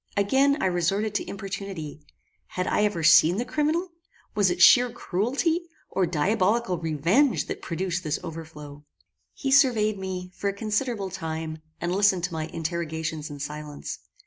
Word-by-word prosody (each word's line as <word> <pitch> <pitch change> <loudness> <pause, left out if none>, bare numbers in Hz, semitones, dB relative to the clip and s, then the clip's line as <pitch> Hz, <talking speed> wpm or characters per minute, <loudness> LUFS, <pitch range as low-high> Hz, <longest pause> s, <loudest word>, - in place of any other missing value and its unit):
Again 270 +8 +3
I - - 0
resorted 190 +4 0
to 205 - -2
importunity. 195 -6 -6 0.5
Had 180 - -3
I 210 - +1
ever 175 -6 -1
seen 165 +3 +6
the 240 - -1
criminal? 315 +6 0 0.4
Was 205 -3 +3
it 175 0 -2
sheer 245 +6 +7
cruelty, 270 - -1 0.2
or 190 -2 +1
diabolical 185 +4 +1
revenge 170 - +2
that - - -6
produced 175 0 -3
this 155 -1 -1
overthrow? 150 -3 -9 0.5
He 270 - -2
surveyed 225 -7 +4
me, 185 -1 -5
for 200 - -1
a - - -3
considerable 215 -1 -2
time, 160 -3 -5 0.2
and 175 +1 -2
listened 195 -3 +3
to 180 -1 -2
my 160 -1 -3
interrogations 160 -2 -4
in 145 -1 -8
silence. 150 0 -6
185 Hz, 150 wpm, -26 LUFS, 160-215 Hz, 0.5 s, sheer